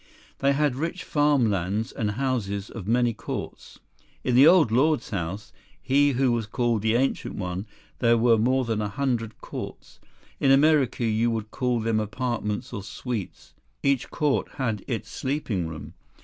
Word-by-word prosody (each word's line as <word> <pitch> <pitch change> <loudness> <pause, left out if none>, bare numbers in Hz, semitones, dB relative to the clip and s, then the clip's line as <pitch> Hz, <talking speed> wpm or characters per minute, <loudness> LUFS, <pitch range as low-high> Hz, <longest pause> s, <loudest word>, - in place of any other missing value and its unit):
They 140 0 +3
had 145 -2 +1
rich 165 +5 -3
farm 145 -6 +2
lands 100 +4 -1
and 105 -2 -2
houses 105 -6 -2
of 105 -5 -8
many 120 +1 +2
courts. - - -7 0.5
In 125 - 0
the 135 +5 +8
Old 165 -9 +6
Lord's 135 +1 +2
house, 95 +2 -4 0.3
he 140 +1 +3
who 130 0 +2
was 115 -2 -1
called 120 -2 0
the 110 +1 +1
Ancient 135 +3 0
One, 95 +2 -4 0.3
there 115 -1 +4
were 115 -1 +4
more 130 +3 +2
than 110 -2 -1
a 105 - -2
hundred 115 -2 -2
courts. - - -8 0.4
In 135 - +3
America 135 -3 +4
you 115 +1 +2
would 110 -2 -3
call 125 -2 0
them 110 0 +1
apartments 115 0 -3
or 100 - -4
suites. 110 +1 -6 0.3
Each 140 -3 +1
court 150 -3 0
had 115 -6 -2
its 115 -4 -3
sleeping 130 - -2
room. 80 -2 -8
120 Hz, 165 wpm, -25 LUFS, 110-135 Hz, 0.5 s, the